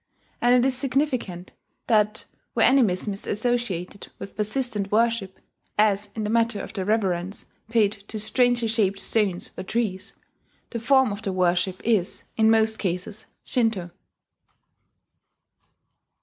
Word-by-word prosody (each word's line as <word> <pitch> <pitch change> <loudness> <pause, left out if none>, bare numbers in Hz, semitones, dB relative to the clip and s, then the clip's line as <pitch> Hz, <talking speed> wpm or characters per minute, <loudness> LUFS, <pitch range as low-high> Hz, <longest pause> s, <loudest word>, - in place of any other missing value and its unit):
And 245 +1 +5
it 250 0 +4
is 265 - +1
significant 250 - -1 0.3
that 215 -1 +2 0.3
where - - +4
animism 210 -7 +3
is 195 - -8
associated 210 -5 -2
with 195 - -9
persistent 215 -2 -2
worship 225 -3 +1 0.4
(as 205 -1 +2
in 220 - -3
the 210 - -2
matter 230 -2 +2
of - - -7
the 190 -4 -3
reverence 195 -3 -1 0.2
paid 220 -3 +3 0.2
to 220 - -3
strangely 245 +2 +2
shaped 210 -3 +1
stones 195 -3 -1
or - - -3
trees), 200 -2 -3 0.6
the 235 - -3
form 265 0 +4
of 200 +1 -5
the 200 - -2
worship 180 0 +1
is, 215 -6 +1
in 220 0 +4
most 220 0 +3
cases, 190 +3 -3 0.2
Shinto. 220 -8 0
215 Hz, 135 wpm, -24 LUFS, 195-235 Hz, 0.6 s, And